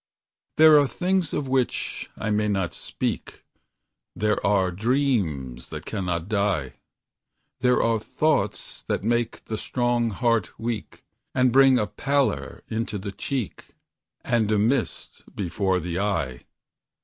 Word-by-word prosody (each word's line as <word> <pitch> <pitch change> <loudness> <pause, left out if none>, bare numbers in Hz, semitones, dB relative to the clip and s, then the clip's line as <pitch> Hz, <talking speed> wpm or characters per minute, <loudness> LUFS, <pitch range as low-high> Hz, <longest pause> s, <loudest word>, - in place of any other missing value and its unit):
There 155 -1 +8
are 145 - +3
things 180 +5 0
of 145 - -2
which 130 -2 -1
I 110 - -2
may 105 0 +1
not 95 -4 0
speak; - - -4 0.7
There 105 0 0
are 95 -2 +2
dreams 95 - 0
that - - -7
cannot 90 -3 -2
die; 100 -10 0 0.9
There 125 0 +3
are 115 -1 +2
thoughts 110 -3 -1
that - - -1
make 120 +1 -1
the 110 -1 -4
strong 120 -2 0
heart 115 -3 0
weak, 110 -8 -5 0.3
And 130 -2 +3
bring 135 -1 +7
a 105 - +2
pallor 140 +5 -1
into 110 -1 -2
the 100 +1 -5
cheek, 125 +2 -5 0.5
And 115 -3 +1
a 105 - +3
mist 115 +4 -1
before 95 0 0
the 90 +1 -3
eye. 80 -12 -2
110 Hz, 130 wpm, -25 LUFS, 95-125 Hz, 0.9 s, There